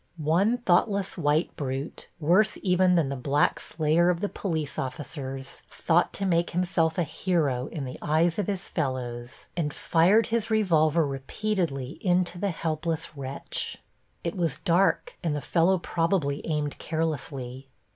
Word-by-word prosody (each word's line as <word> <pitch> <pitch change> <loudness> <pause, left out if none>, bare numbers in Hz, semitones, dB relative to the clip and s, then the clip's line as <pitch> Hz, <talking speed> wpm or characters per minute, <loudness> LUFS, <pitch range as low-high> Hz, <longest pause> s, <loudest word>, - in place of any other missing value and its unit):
One 170 +10 +2
thoughtless 200 -2 +1
white 155 0 +1
brute, 135 +1 -4
worse 180 +8 +3
even 180 -1 +4
than 160 -6 +2
the 140 - -2
black 140 +3 +1
slayer 160 +2 +2
of 175 -1 +1
the 205 - -1
police 160 -7 -3
officers, 135 -1 -5
thought 175 +1 +2
to 195 - -2
make 170 -2 +2
himself 175 -2 +1
a 175 - +3
hero 150 -5 0
in 145 -4 -5
the 125 - -7
eyes 165 +4 +2
of 205 - -1
his 195 -2 -2
fellows 125 -5 -4
and 160 -4 -1
fired 185 +10 +3
his 230 -1 +1
revolver 165 -7 +3
repeatedly 140 0 -2
into 180 -2 +1
the 200 +1 0
helpless 160 -1 -2
wretch. 135 -1 -4 0.5
It 170 - -2
was 170 -6 0
dark 180 +3 +1
and 160 -3 0
the - - -1
fellow 175 +5 +2
probably 165 -4 0
aimed 150 -2 -2
carelessly. 140 -5 -3
165 Hz, 145 wpm, -27 LUFS, 145-180 Hz, 0.5 s, even